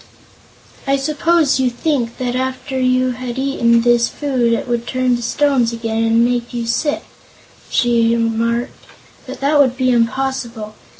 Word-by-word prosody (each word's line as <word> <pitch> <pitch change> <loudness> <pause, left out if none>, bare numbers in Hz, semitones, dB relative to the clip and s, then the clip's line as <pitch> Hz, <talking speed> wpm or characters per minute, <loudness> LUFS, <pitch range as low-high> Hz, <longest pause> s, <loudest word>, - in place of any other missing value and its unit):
"I 275 - +3
suppose 305 +1 +1
you 260 -1 +2
think 245 -2 -2
that 250 -1 -2
after 260 +1 -3
you 255 0 +2
had 250 0 -6
eaten 240 -4 +2
this 240 -1 +3
food 260 -5 -1
it 230 - -1
would 240 0 -2
turn 255 -1 +1
to 240 - -5
stones 260 -1 +1
again 225 -1 -2
and 230 +1 +3
make 240 0 -2
you 235 -1 -2
sick," 265 +6 -1 0.7
she 235 -2 +2
remarked; 230 +2 -1 0.5
"but - - -8
that 290 +2 +2
would 260 -3 +3
be 255 -1 +2
impossible. 235 -2 -1
245 Hz, 155 wpm, -17 LUFS, 235-265 Hz, 0.7 s, I